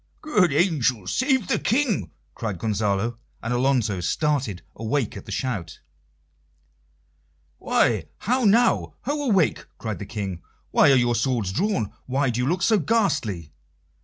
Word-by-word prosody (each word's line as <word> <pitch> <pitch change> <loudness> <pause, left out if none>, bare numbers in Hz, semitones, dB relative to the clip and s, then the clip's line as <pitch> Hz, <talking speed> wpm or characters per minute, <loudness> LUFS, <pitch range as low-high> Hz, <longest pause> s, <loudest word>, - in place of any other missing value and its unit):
"Good 210 - +3
angels 135 - +1
save 260 -6 +1
the - - +1
King!" 240 -2 +1 0.2
cried 105 -5 -4
Gonzalo; 105 +3 -1 0.3
and 120 +2 -1
Alonso 120 -6 +1
started 130 - -1
awake 115 +2 -1
at - - -9
the - - -7
shout. 100 - -3 1.8
"Why! - - +2 0.2
how 250 +4 +1
now? 230 +3 +3
Ho, 290 +3 -2
awake!" 190 -7 +2
cried 110 -3 -4
the 100 - -7
King. 95 -6 -4 0.3
"Why - - +5
are - - +6
your 120 -1 +3
swords 115 -4 0
drawn? 110 - -1
Why 135 0 +1
do 120 - -3
you 125 - 0
look 180 +5 0
so 220 -3 +4
ghastly?" 145 - 0
125 Hz, 140 wpm, -24 LUFS, -, 1.8 s, are